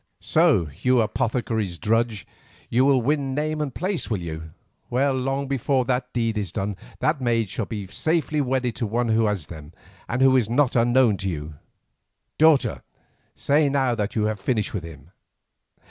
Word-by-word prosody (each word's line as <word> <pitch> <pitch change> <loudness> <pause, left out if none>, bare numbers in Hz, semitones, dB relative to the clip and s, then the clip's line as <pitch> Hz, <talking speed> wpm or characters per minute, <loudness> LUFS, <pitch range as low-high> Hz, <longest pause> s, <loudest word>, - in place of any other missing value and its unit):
"So, 155 - +3
you 125 0 +3
apothecary's 110 -4 -1
drudge, 115 0 0 0.5
you 125 +3 +3
will 135 -3 +3
win 140 0 0
name 155 +1 -1
and 145 -2 -2
place, 185 +5 -2
will 110 - 0
you! 80 -2 -6 0.4
Well, 135 +3 +1
long 135 +2 -1
before 135 -1 0
that 125 0 -1
deed 115 -3 -1
is 100 -5 -4
done 100 +2 -3 0.2
the 155 - +1
maid 115 -4 0
shall 105 +3 -3
be 105 -4 -5
safely 155 - 0
wedded 130 -3 -1
to 115 - -1
one 120 +2 -1
who 110 0 +3
has 100 -7 -2
them 75 0 -11 0.4
and 125 +3 +1
who 135 0 +5
is 120 -5 +2
not 125 +2 +2
unknown 120 -2 +4
to 95 - -3
you. 75 -2 -5 0.9
Daughter, 155 -3 +4 0.5
say 145 +1 +2
now 135 -3 +1
that 105 -2 -3
you 110 - +1
have 110 -1 -2
finished 105 +1 -1
with 95 - -3
him." 80 -1 -12
120 Hz, 175 wpm, -24 LUFS, 105-135 Hz, 0.9 s, who